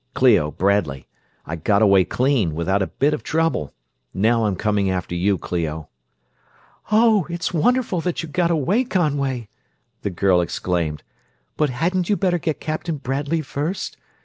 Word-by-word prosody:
"Clio, 75 - +4
Bradley 85 -7 0 0.4
I 80 - -4
got 100 +6 +2
away 100 -3 +5
clean, 120 - +1
without 95 +5 0
a 95 - 0
bit 145 +3 +1
of 150 - -3
trouble. 160 - -1 0.4
Now 115 +3 +2
I'm 100 -3 0
coming 105 -1 0
after 90 -1 -2
you, 95 +3 +1
Clio." 80 -4 -4 1.0
"Oh, 215 -4 +4
it's 170 +1 -3
wonderful 225 +1 +1
that 175 0 -2
you - - -5
got 170 +3 +1
away, 170 - +2
Conway!" 140 - -1 0.5
the - - -2
girl 90 0 +2
exclaimed. 85 -4 -2 0.5
"But 150 -2 +1
hadn't 175 +7 -1
you 205 - +2
better 180 -3 +1
get 155 -1 -2
Captain 155 +1 -3
Bradley 140 +4 -2
first? 150 +7 -4
130 Hz, 150 wpm, -21 LUFS, -, 1.0 s, away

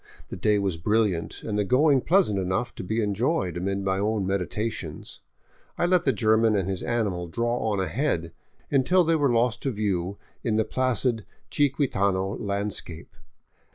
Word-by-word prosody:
The - - -6
day 105 -1 +2
was 95 -4 -1
brilliant, 105 -1 0
and 105 -1 -2
the - - +2
going 135 +5 +3
pleasant 170 - +2
enough 95 +5 -1
to - - -7
be 110 +4 -1
enjoyed 105 - 0
amid 95 +3 -2
my 95 0 0
own 105 -1 0
meditations. 100 +4 -3 0.6
I - - +1
let 180 -1 +2
the 135 - +4
German 110 -2 +3
and 95 -3 0
his 95 -2 -2
animal 100 -7 -1
draw 120 +7 -1
on 100 - 0
ahead, 95 - -1 0.4
until 160 +7 +4
they 165 0 +2
were 145 -4 +2
lost 120 +1 +1
to 135 - -1
view 100 -3 -2 0.3
in 115 -4 0
the 110 0 +2
placid 125 -3 0 0.3
chiquitano 100 -9 +1
landscape. 100 -5 -4
105 Hz, 160 wpm, -26 LUFS, 95-125 Hz, 0.6 s, the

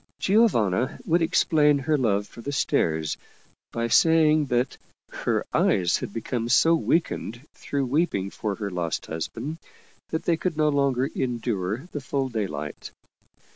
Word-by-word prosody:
Giovanna 130 - +2
would 170 +2 +2
explain 155 -3 +3
her 150 +3 0
love 105 -7 +1
for 115 - -12
the 140 - -4
stairs 80 - 0 0.5
by 115 0 -1
saying 155 +3 +4
that 125 0 0 0.3
her - - -1
eyes 90 -2 +2
had - - -6
become 115 +2 -3
so 165 +6 +5
weakened 160 -8 0
through 140 -1 -3
weeping 125 - 0
for 105 -2 -3
her 100 -2 -4
lost 85 -2 -3
husband 140 - -5 0.5
that 160 - -2
they 165 - +2
could 165 -2 -2
no 155 -1 +3
longer 140 -3 +1
endure 120 - -2
the 145 - -5
full 135 0 -2
day 110 -4 -2
light. 75 -2 -6
130 Hz, 145 wpm, -25 LUFS, 105-155 Hz, 0.5 s, so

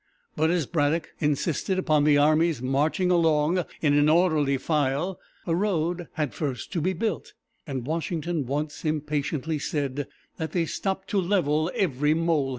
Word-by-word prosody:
But 160 - +2
as 170 -3 +1
Braddock 155 +2 0
insisted 155 +5 0
upon 155 -5 +2
the 150 -1 +5
army's 155 0 +3
marching 150 - +1
along 165 0 +3 0.2
in 145 -2 +3
an 145 +1 +4
orderly 155 -5 +3
file, 150 +5 -1 0.3
a 165 - +1
road 175 -3 -1
had 150 -6 -2
first 135 - -4
to 170 - 0
be 185 +4 +1
built, 195 0 -3 0.3
and 130 -4 -4
Washington 160 -1 -2
once 145 +2 -3
impatiently 150 0 -1
said 140 -2 -2 0.3
that 160 -1 -4
they 170 -2 +1
stopped 190 +3 -3
"to 200 - +1
level 170 -4 +1
every 150 -4 +1
molehill." 165 -4 +1
155 Hz, 155 wpm, -26 LUFS, 145-170 Hz, 0.3 s, the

